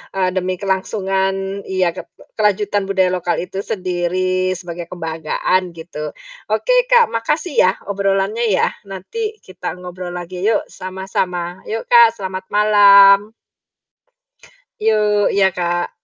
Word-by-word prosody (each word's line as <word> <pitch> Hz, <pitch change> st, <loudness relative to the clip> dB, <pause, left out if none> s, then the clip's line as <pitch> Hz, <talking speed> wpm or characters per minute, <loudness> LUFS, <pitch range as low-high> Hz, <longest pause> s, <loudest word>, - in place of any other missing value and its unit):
eee, 185 Hz, -1 st, +1 dB
demi 185 Hz, 0 st, -2 dB
kelangsungan 195 Hz, 0 st, -2 dB
ya, 185 Hz, -2 st, +1 dB
ket 185 Hz, -, -9 dB
e -, -, -18 dB
kelanjutan 205 Hz, -1 st, +1 dB
budaya 190 Hz, -2 st, +2 dB
lokal 180 Hz, -1 st, -1 dB
itu 190 Hz, +1 st, -6 dB
sendiri, 185 Hz, -1 st, -1 dB
sebagai 175 Hz, -1 st, -7 dB
kebanggaan, 170 Hz, +2 st, -2 dB
gitu. 160 Hz, -2 st, -7 dB, 0.4 s
Oke, -, -, +2 dB
Kak, 480 Hz, -2 st, +5 dB
makasih 300 Hz, +8 st, -2 dB
ya, 185 Hz, -, +5 dB, 0.2 s
obrolannya 200 Hz, +3 st, 0 dB
ya, -, -, +2 dB, 0.2 s
nanti 425 Hz, -, -5 dB
kita 185 Hz, -1 st, -6 dB
ngobrol 180 Hz, 0 st, -8 dB
lagi 180 Hz, +2 st, -5 dB
yuk, 220 Hz, -1 st, +2 dB
sama-sama. 185 Hz, -1 st, -4 dB
Yuk, 225 Hz, +1 st, -4 dB
Kak, 235 Hz, -2 st, +7 dB
selamat 190 Hz, -2 st, -6 dB
malam. 205 Hz, 0 st, +6 dB, 1.5 s
Yuk, 210 Hz, -2 st, +2 dB
iya, 195 Hz, -1 st, +4 dB
Kak. 175 Hz, 0 st, -1 dB
190 Hz, 125 wpm, -18 LUFS, 180-205 Hz, 1.5 s, Kak